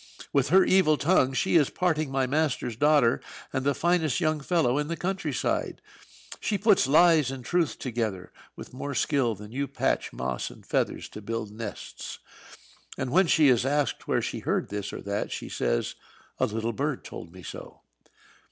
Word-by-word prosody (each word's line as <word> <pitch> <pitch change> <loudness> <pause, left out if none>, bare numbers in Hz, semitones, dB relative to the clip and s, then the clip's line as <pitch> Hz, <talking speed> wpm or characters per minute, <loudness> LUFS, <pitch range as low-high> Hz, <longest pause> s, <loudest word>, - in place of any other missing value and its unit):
"With 140 -3 +2
her 190 +3 +6
evil 185 -5 +4
tongue 145 -5 +3
she 170 +6 +2
is 145 -4 +3
parting 155 -5 0
my 135 -1 +1
master's 135 -4 0
daughter 145 -2 +3 0.3
and 130 -1 -1
the 140 0 +1
finest 170 -6 +1
young 155 -3 +1
fellow 145 -4 +1
in 150 - -1
the 165 +1 -3
country 190 +4 -2
side. - - -1 0.6
She 210 - -1
puts 205 - +4
lies 155 -1 +5
and 130 -2 -7
truth 175 -4 0
together, 110 -7 -3 0.2
with - - -10
more 140 +2 -5
skill 130 -5 +1
than 105 +2 -11
you 140 +3 -2
patch 140 - -1
moss 65 -1 -3
and - - -15
feathers - - -1
to 105 - -9
build 110 0 -4
nests. 110 +1 -7 0.8
And 130 -1 -3
when 185 +4 +4
she 155 -3 +5
is 120 -2 +4
asked 145 +1 -1
where - - +1
she - - -3
heard - - -1
this 105 -1 -4
or - - -7
that, 100 +1 -3
she - - -5
says, - - -1 0.5
'A - - +3
little 115 +2 -2
bird 140 +2 -2
told - - -9
me 90 0 -13
so.'" - - -9
140 Hz, 180 wpm, -27 LUFS, 115-160 Hz, 0.8 s, her